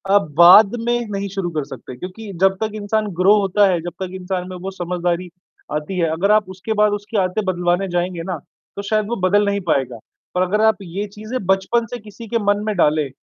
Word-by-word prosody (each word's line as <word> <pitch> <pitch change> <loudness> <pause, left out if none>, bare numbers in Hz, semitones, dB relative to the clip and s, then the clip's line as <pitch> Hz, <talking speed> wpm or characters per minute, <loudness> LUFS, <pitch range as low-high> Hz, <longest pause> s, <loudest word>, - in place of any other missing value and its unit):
अब 155 -7 +2
बाद 195 +6 +8
में 240 0 +1
नहीं 200 0 -2
शुरू 195 -2 -3
कर 155 -2 -2
सकते 130 0 -9
क्योंकि 195 - -8
जब 190 0 +4
तक 220 -1 -1
इंसान 215 +1 -1
ग्रो 195 +3 +6
होता 200 +1 +3
है, 175 - +1
जब 175 - -5
तक 185 - -4
इंसान 180 0 -3
में 185 - -7
वो 190 +2 -6
समझदारी 175 0 -2 0.4
आती 150 +5 -3
है। 165 -2 +2
अगर 190 +6 +1
आप 210 -3 +3
उसके 190 +4 -4
बाद 210 -1 +3
उसकी 205 +1 -4
आदतें 185 +3 -1
बदलवाने 180 +1 0
जाएँगे 175 -1 -2
ना, 180 -1 -3 0.4
तो 200 - -4
शायद 215 +1 0
वो 235 - -1
बदल 205 +2 +3
नहीं 200 0 0
पाएगा। 130 -5 0 0.4
और 180 - +2
अगर 200 +4 +1
आप 220 - +4
ये 190 +4 -4
चीज़ें 215 +5 -6
बचपन 195 +5 +1
से - - -2
किसी 215 +2 -11
के 230 +2 0
मन 205 +1 +1
में 215 - -1
डाले 150 -3 +2
195 Hz, 220 wpm, -20 LUFS, 175-210 Hz, 0.4 s, बाद